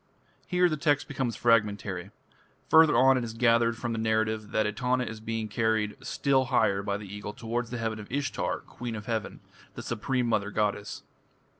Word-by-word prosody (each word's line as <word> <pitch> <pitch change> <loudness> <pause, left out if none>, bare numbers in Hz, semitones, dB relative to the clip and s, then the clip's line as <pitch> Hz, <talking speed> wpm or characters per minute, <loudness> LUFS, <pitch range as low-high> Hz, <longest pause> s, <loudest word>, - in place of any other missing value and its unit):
Here 180 0 +3
the 155 -3 -1
text 145 -1 +1
becomes 130 -6 -2
fragmentary. 105 -5 +1 0.6
Further 160 -6 +7
on 130 +1 +6
it - - -3
is 115 -1 -6
gathered 115 0 +3
from 120 0 -3
the 115 - -2
narrative 110 -1 0
that 110 - +1
Etana 125 +4 0
is 110 -2 -6
being 110 0 -3
carried 110 -1 0
still 135 -2 +1
higher 100 -5 +2
by 100 0 -2
the 105 - -9
Eagle 105 +1 -7
towards 115 +2 -3
the 120 - -4
heaven 110 -1 -3
of 105 - -10
Ishtar, 140 +1 -2
"Queen 120 -2 -7
of 105 -1 -7
Heaven", 110 -2 -3 0.3
the - - -7
supreme 125 +2 -1
mother 105 -3 0
goddess. 105 0 -2
115 Hz, 180 wpm, -28 LUFS, 105-125 Hz, 0.6 s, Further